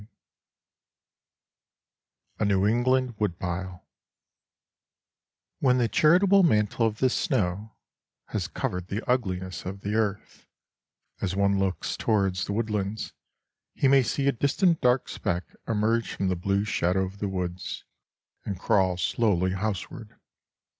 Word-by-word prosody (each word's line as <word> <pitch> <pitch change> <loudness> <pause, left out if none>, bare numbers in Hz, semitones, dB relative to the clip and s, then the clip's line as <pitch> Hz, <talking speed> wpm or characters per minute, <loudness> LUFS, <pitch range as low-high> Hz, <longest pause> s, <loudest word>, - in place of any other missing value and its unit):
XLIX - - -18 2.3
A - - +1
NEW 100 -1 +2
ENGLAND 125 +2 +2
WOODPILE 90 -2 -3 1.7
When 125 -2 +3
the 120 -2 +2
charitable 185 - +5
mantle 110 - +2
of 110 -1 -4
the 130 - +3
snow 110 - -1 0.5
has - - -2
covered 90 0 -4
the 105 +5 -4
ugliness 95 -8 -1
of 95 +2 -6
the 100 +1 -3
earth, 105 -2 -2 0.7
as 95 -1 -1
one 100 0 +2
looks 95 -4 -1
towards 95 -4 0
the 100 - -3
woodlands 105 -1 -2 0.6
he 140 - +2
may 135 0 +6
see 135 +3 -1
a - - +5
distant 155 - +1
dark 125 +1 +2
speck 85 +1 -2 0.2
emerge 115 +1 0
from 95 - -1
the 90 - +1
blue 100 +3 0
shadow 95 -3 +1
of 95 +2 -10
the 100 - -2
woods 90 -1 -4 0.6
and 100 -3 -5
crawl 95 -2 +2
slowly 95 -2 +1
houseward. 105 +3 -4
105 Hz, 125 wpm, -26 LUFS, 95-120 Hz, 2.3 s, may